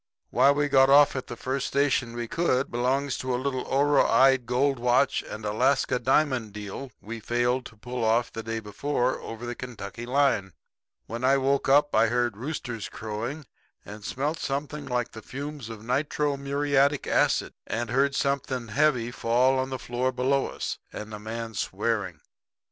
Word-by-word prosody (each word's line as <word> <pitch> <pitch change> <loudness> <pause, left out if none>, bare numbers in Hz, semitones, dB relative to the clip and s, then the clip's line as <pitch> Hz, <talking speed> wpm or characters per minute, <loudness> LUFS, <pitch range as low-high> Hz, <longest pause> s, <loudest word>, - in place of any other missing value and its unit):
Why 130 +3 +5
we 145 +1 +2
got 135 -1 +5
off 145 +1 +6
at 130 - -4
the 120 - -6
first 130 +2 -2
station 135 -4 +1
we 120 -1 -3
could, 140 -3 0
belongs 130 +3 0
to 130 -1 -1
a - - 0
little 130 0 -2
oroide 135 -2 +4
gold 135 +2 +1
watch 125 +3 +2
and 110 0 -8
Alaska 125 +4 +2
diamond 130 -6 +1
deal 105 +6 -7
we 115 +2 -7
failed 120 +3 0
to 115 - -18
pull 125 +2 -4
off 115 +2 +2
the 115 - -4
day 115 0 -3
before, 125 +4 -1
over 115 +1 -7
the 120 - -3
Kentucky 120 -2 -7
line. 125 -8 +2 0.5
"When 115 +2 -6
I 135 +2 +4
woke 135 0 +1
up 145 +2 +4
I 115 - +5
heard 120 -1 0
roosters 120 -3 -5
crowing, 115 +8 -5 0.4
and 105 0 -10
smelt 145 +9 -2
something 145 +2 -3
like 125 -1 -1
the 110 - -9
fumes 140 -1 -7
of 110 -2 -8
nitro 145 +3 0
muriatic 140 0 +1
acid, - - +1
and 115 +2 -3
heard 135 +2 +2
something 135 -4 -1
heavy 125 -2 +2
fall 125 +3 +2
on 130 0 -1
the 130 - -3
floor 125 +1 -1
below 130 +2 +1
us, - - -5
and 105 0 -7
a 105 - -6
man 115 +1 -5
swearing. 95 - -2
130 Hz, 170 wpm, -26 LUFS, 115-140 Hz, 0.5 s, off